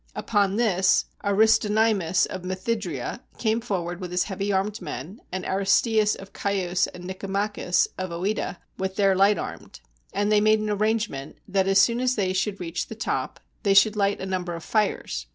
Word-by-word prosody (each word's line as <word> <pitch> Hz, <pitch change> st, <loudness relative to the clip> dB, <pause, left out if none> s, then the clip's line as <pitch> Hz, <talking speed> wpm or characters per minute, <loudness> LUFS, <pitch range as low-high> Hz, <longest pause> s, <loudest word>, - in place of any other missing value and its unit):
Upon 200 Hz, -3 st, +1 dB
this 195 Hz, -5 st, +3 dB, 0.2 s
Aristonymus 210 Hz, -2 st, +3 dB
of 185 Hz, -, -6 dB
Methydria 185 Hz, -, -3 dB, 0.2 s
came 225 Hz, 0 st, 0 dB
forward 180 Hz, -5 st, -3 dB
with 180 Hz, -, -5 dB
his 180 Hz, 0 st, +1 dB
heavy 200 Hz, 0 st, -3 dB
armed 200 Hz, +2 st, -1 dB
men, 160 Hz, -, -7 dB
and 185 Hz, 0 st, -4 dB
Aristeas 210 Hz, +3 st, +2 dB
of 195 Hz, 0 st, -12 dB
Chios 185 Hz, -3 st, 0 dB
and 180 Hz, 0 st, -11 dB
Nicomachus 195 Hz, 0 st, 0 dB
of 185 Hz, 0 st, -3 dB
CEta 185 Hz, +3 st, -2 dB, 0.2 s
with 190 Hz, 0 st, -2 dB
their 195 Hz, -1 st, +3 dB
light 200 Hz, +2 st, +4 dB
armed; -, -, -7 dB, 0.3 s
and 205 Hz, +1 st, 0 dB
they 210 Hz, -1 st, +5 dB
made 215 Hz, +1 st, +5 dB
an 215 Hz, 0 st, -2 dB
arrangement, 210 Hz, -9 st, -1 dB
that 195 Hz, -1 st, +1 dB
as 195 Hz, 0 st, +5 dB
soon 235 Hz, +4 st, +4 dB
as 255 Hz, 0 st, +1 dB
they 190 Hz, -3 st, 0 dB
should 195 Hz, +1 st, -1 dB
reach 170 Hz, -1 st, -3 dB
the 225 Hz, -, -8 dB
top, 225 Hz, -, -3 dB, 0.2 s
they 200 Hz, -3 st, +2 dB
should 210 Hz, +2 st, +6 dB
light 200 Hz, -1 st, +1 dB
a -, -, -4 dB
number 180 Hz, -2 st, -3 dB
of 165 Hz, -, -8 dB
fires. 205 Hz, -, -1 dB
195 Hz, 175 wpm, -25 LUFS, 185-215 Hz, 0.3 s, should